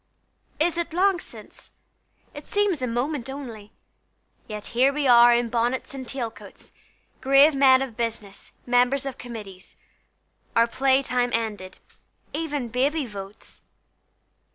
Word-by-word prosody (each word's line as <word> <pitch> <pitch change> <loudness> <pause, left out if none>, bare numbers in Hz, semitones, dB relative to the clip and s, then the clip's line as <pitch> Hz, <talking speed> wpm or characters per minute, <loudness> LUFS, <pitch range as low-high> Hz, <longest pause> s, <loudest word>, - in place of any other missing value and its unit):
Is 340 +2 +1
it 340 -1 -3
long 375 +1 +2
since? - - -13 0.6
it 290 - -10
seems 405 -7 0
a 255 - -1
moment 250 +3 -2
only: 235 -7 -8 0.8
Yet 210 -1 -7
here 255 +4 +4
we 290 0 -2
are 240 -1 +7
in 240 0 +2
bonnets 240 +3 -1
and 260 -2 -7
tail 245 -4 -4
coats, - - -15 0.5
Grave 275 +3 +6
men 270 -1 +5
of 250 -5 -8
business, 220 -4 -5
members 250 +3 +2
of 270 - -6
committees, 210 -6 -10 0.8
Our 230 - +5
play 265 +3 +2
time 250 -1 0
ended: 210 -5 -3 0.6
even 295 -6 -3
Baby 275 +5 0
votes! 200 -2 -9
250 Hz, 130 wpm, -24 LUFS, 230-275 Hz, 0.8 s, are